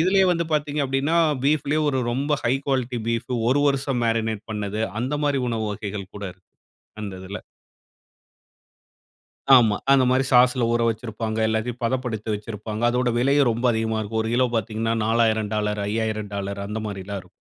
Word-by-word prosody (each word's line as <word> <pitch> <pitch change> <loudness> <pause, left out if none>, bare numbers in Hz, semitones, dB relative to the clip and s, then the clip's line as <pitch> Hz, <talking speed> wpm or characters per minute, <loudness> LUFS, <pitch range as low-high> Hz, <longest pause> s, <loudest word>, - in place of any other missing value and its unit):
இதிலேயே 190 +3 +4
வந்து 170 0 0
பார்த்தீங்க 150 0 -1
அப்பிடின்னா, 135 +5 0 0.3
பீஃப்லே 150 +1 +2
ஒரு 135 - 0
ரொம்ப 140 +4 -1
ஹை 120 - +3
குவாலிட்டி 130 -3 -1
பீஃப் 115 +2 -2 0.2
ஒரு 145 +2 +3
வருடம் 135 -3 0
மேரினேட் 110 -1 -1
பண்ணது, 105 +1 -3 0.2
அந்தமாரி 145 +2 0
உணவு 110 -2 -1
வகைகள் 100 -2 -6
கூட 100 - -6
இருக்கு. 90 +1 -32 0.5
அந்த 100 -2 -5
இதில. 95 +2 -6 2.2
ஆமா. 115 -5 +5 0.2
அந்தமாரி 130 0 +4
சாஸ்ல 125 -1 +5
ஊற 120 - +1
வச்சிருப்பாங்க. 110 0 -4
எல்லாத்தையும் 115 +3 -2
பதப்படுத்தி 115 -3 -2
வச்சிருப்பாங்க. 105 +1 -6
அதோட 125 0 +1
விலையும் 140 +2 +3
ரொம்ப 120 +3 -4
அதிகமா 110 0 -1
இருக்கும். 110 +1 -2
ஒரு 110 - -3
கிலோ 130 +1 +3
பார்த்தீங்கன்னா 115 +1 -1
$4,000, 110 -1 +2
$5000 105 -1 -2
அந்தமாரிலாம் 100 -2 -4
இருக்கும். 90 - -21
115 Hz, 140 wpm, -23 LUFS, 105-130 Hz, 2.2 s, ஆமா